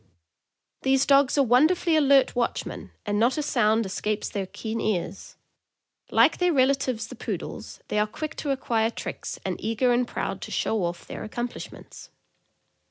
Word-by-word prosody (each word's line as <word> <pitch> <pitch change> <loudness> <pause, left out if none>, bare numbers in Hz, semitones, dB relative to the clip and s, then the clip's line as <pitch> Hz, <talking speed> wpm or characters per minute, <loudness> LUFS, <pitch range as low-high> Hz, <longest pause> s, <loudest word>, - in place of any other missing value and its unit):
These 270 0 +3
dogs 280 0 +4
are 280 - +5
wonderfully 310 +7 +3
alert 280 -4 +4
watchmen, 240 -1 -2 0.2
and 205 -1 0
not 240 +6 +3
a 300 - 0
sound 225 -5 +2
escapes 210 +2 -2
their 195 -2 -3
keen 220 +3 -4
ears. 195 -3 -3 0.7
Like - - +4
their 360 -1 +3
relatives 265 -4 +1
the - - -10
Poodles, - - -6
they 210 - 0
are 210 - +2
quick 310 +7 -6
to 295 - -4
acquire 230 -4 +1
tricks - - -6
and - - -3
eager 230 +3 +2
and 245 0 +1
proud - - -4
to - - -6
"show 215 -5 0
off" 170 0 -5
their - - -7
accomplishments. 240 +2 -7
245 Hz, 160 wpm, -26 LUFS, 215-275 Hz, 0.7 s, are